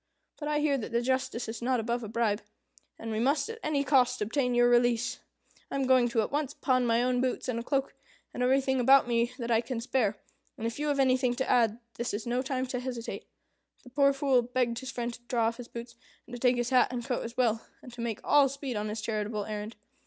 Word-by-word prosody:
But 295 - -4
I 300 0 +1
hear 285 -2 +2
that 230 - -6
the 235 +1 +1
justice 260 -1 -1
is 225 +2 -6
not 250 +1 +1
above 235 +2 -2
a - - -5
bribe, 220 -1 0 0.6
and 225 - -6
we 215 - -1
must 280 +4 +2
at 455 - -9
any 295 -2 0
cost 255 -2 +3
obtain 245 +3 0
your 240 0 +5
release. 240 -1 +2 0.5
I - - -5
am 275 -1 0
going 255 -2 +4
at 220 -2 +1
once 290 -1 -1
to - - -38
pawn 255 -2 +2
my 230 +1 +3
own 250 0 +1
boots 255 0 -1
and 235 -2 -2
cloak, 270 +1 -1 0.4
and - - -4
everything 265 +1 +2
about 265 +1 +6
me 235 0 +1
that 235 -1 -3
I 225 0 +4
can 240 0 -4
spare, 230 -4 0 0.4
and 225 - -5
if 230 +3 -3
you 300 - -1
have 285 -1 0
anything 255 -2 +3
to 265 +1 -2
add, 230 -2 +3 0.2
this 235 -3 -2
is 210 - -5
no 245 +1 0
time 260 -1 -2
to 250 -1 -3
hesitate." 245 -2 -5 0.6
The 250 - -14
poor 280 +1 +4
Fool 275 -2 +2
begged 245 -1 -1
his 260 - -7
friend 240 0 -3
to 240 - -11
draw 235 -3 +1
off 230 +1 -1
his 245 -2 -8
boots, 235 0 -8 0.3
and 245 - -14
to 245 - -5
take 250 0 +3
his 240 0 -2
hat 255 -1 +5
and 240 -2 -4
coat 255 -3 -1
as 235 +2 -8
well, 230 -3 +2 0.2
and 250 - -11
to 240 - -7
make 230 -3 -3
all 285 -2 +5
speed 275 -2 -5
on 210 0 -2
his 215 +1 -4
charitable 210 -1 -2
errand. 215 +1 -5
245 Hz, 245 wpm, -29 LUFS, 230-260 Hz, 0.6 s, about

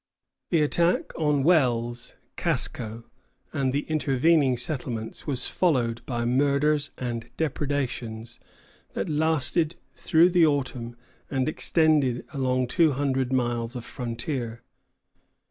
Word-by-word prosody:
The 165 -4 +3
attack 170 +4 +1
on 150 -3 +1
Wells, 120 -7 +1 0.2
Casco, 115 0 -2 0.5
and 135 -2 0
the 140 +2 0
intervening 150 -2 +2
settlements 120 -4 -4
was 130 -4 0
followed 120 -9 +1
by 120 -2 -2
murders 140 +4 +2
and 120 -2 -4
depredations 125 -6 -3 0.5
that 100 - -3
lasted 160 +1 +1 0.2
through 170 0 +4
the 175 -1 +4
autumn 130 -6 0 0.3
and 130 -2 0
extended 155 -6 +2
along 130 -2 +1
two 160 0 +3
hundred 130 -2 0
miles 120 -2 -1
of 120 - -6
frontier. 120 -1 -4
130 Hz, 110 wpm, -26 LUFS, 120-150 Hz, 0.5 s, through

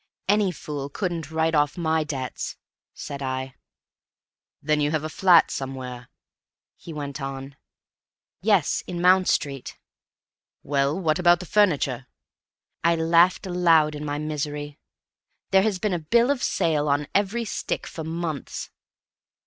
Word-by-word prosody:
"Any 205 -1 +3
fool 145 -5 -6
couldn't 170 -3 -3
write 160 +1 0
off 145 -1 +2
my 160 -2 +1
debts," 135 -5 -5 0.3
said 140 0 -7
I. 130 0 -3 1.1
"Then 150 0 +1
you 145 - +2
have 155 0 -1
a 155 - -3
flat 175 +1 +5
somewhere?" 130 -2 -6 0.7
he 170 - -11
went 145 -2 -5
on. 135 0 -6 0.9
"Yes, 200 -5 +2
in 175 -1 -4
Mount 185 +1 +5
Street." 140 -3 -1 0.9
"Well, 140 +3 0
what 160 -2 +1
about 175 -1 +5
the 185 - -7
furniture?" 145 - +1 0.8
I 170 +1 +4
laughed 170 +4 +3
aloud 165 -4 +3
in 150 0 -6
my 145 -1 -2
misery. 150 -1 -4 0.7
"There's 195 +1 +3
been 205 0 -1
a 175 - 0
bill 235 - +3
of 275 -3 -1
sale 150 -2 +1
on 145 +1 +1
every 205 +4 +1
stick - - -3
for 160 - -7
months!" 160 -2 -4
155 Hz, 135 wpm, -24 LUFS, 145-180 Hz, 1.1 s, flat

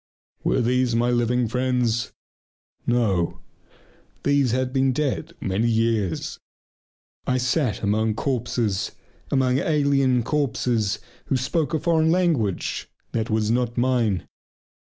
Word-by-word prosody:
Were - - +2
these 125 0 +1
my 120 +1 +2
living 120 0 +1
friends? 125 -1 0 0.8
No, 105 -8 +1 0.8
these 140 -2 +3
had 130 +2 0
been 135 -1 +2
dead 150 +4 -2
many 100 +5 0
years. 110 -5 0 0.9
I 130 - +2
sat 125 -3 0
among 110 +1 +1
corpses, 120 -5 -1 0.4
among 130 -1 +2
alien 140 -5 +2
corpses 120 -6 0 0.3
who 135 - +1
spoke 145 +4 -1
a 160 +2 -1
language 160 - +1 0.2
that 110 -1 -2
was 110 0 +1
not 120 0 0
mine. 120 -6 +1
125 Hz, 110 wpm, -24 LUFS, 110-135 Hz, 0.9 s, these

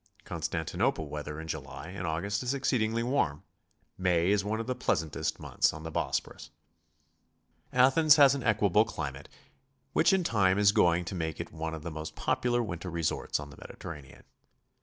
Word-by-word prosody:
Constantinople 85 - -2
weather 75 0 -5
in 80 - -7
July 80 - -6
and 90 -2 -5
August 95 +6 -1
is 130 +2 -1
exceedingly 115 -4 0
warm; 110 - 0 0.6
May 90 0 +2
is 100 -1 +2
one 110 +2 -2
of 115 - -3
the 130 - -1
pleasantest 80 - -1
months - - +1
on 80 - -8
the 80 - -6
Bosporus. 75 -1 -3 1.2
Athens 135 +5 +6
has 140 -3 +7
an 140 - -3
equable 105 -3 +3
climate 75 -10 -6 0.6
which - - +4
in 190 -1 +2
time 100 - +2
is 100 -1 +5
going 90 -5 +3
to 85 - -5
make 80 -4 -3
it - - -6
one 80 0 -4
of 80 - -9
the 85 - -5
most 80 0 -6
popular 120 -1 0
winter 90 -3 -5
resorts 85 -3 -1
on 75 -1 -8
the 70 - -14
Mediterranean. 75 -5 -10
90 Hz, 170 wpm, -30 LUFS, 80-115 Hz, 1.2 s, has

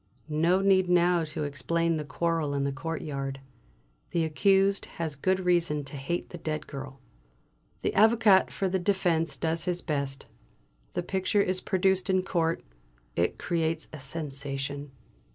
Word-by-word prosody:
No 165 +5 +3
need 190 -2 +4
now 175 -1 +4
to 150 0 -4
explain 165 +4 0
the 155 - -3
quarrel 160 0 -1
in 140 - 0
the 140 - 0
courtyard. 140 -2 -4 0.7
The 170 - +1
accused 195 +5 +3
has 160 -3 -2
good 185 +7 +1
reason 170 -5 +1
to 140 +1 -7
hate 140 +6 -3
the 175 - -7
dead 155 -1 -3
girl. 135 -1 -8 0.8
The - - 0
Avocat 220 -3 +5
for 195 - -1
the 190 0 0
defence 175 -3 +1
does 165 0 -1
his 180 -1 -1
best. 140 -3 -2 0.7
The - - -1
picture 190 +3 +1
is 185 -1 0
produced 190 0 +1
in 185 -1 +3
court; 165 -3 0 0.5
it 85 +1 +1
creates 165 -1 -1
a 155 - -7
sensation. 140 0 -3
165 Hz, 150 wpm, -28 LUFS, 145-185 Hz, 0.8 s, Avocat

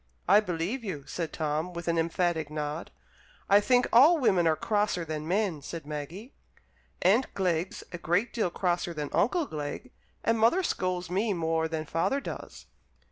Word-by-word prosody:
"I 200 +4 +7
believe 195 +5 -3
you!" 155 -10 -5
said 165 -3 -4
Tom, 155 +3 -2
with 170 0 -6
an 170 0 +2
emphatic 165 -2 0
nod. 150 +1 -4 0.6
"I 200 +1 +6
think 245 +4 +3
all 290 +9 +7
women 190 - +3
are 160 - +3
crosser 205 -3 0
than 155 -1 -4
men," 185 -4 0
said 160 +2 -7
Maggie. 155 - -7 0.7
"Aunt 215 +9 +3
Glegg's 180 -2 -1
a 175 - -6
great 175 +8 0
deal 220 -6 0
crosser 175 -1 -1
than 150 -1 -4
Uncle 325 - +2
Glegg, 155 - -6 0.3
and 230 0 +2
mother 235 +13 +4
scolds 180 - -2
me 205 +3 +1
more 160 -2 0
than 160 -1 -3
father 165 - 0
does." 275 - -8
175 Hz, 165 wpm, -28 LUFS, 160-210 Hz, 0.7 s, I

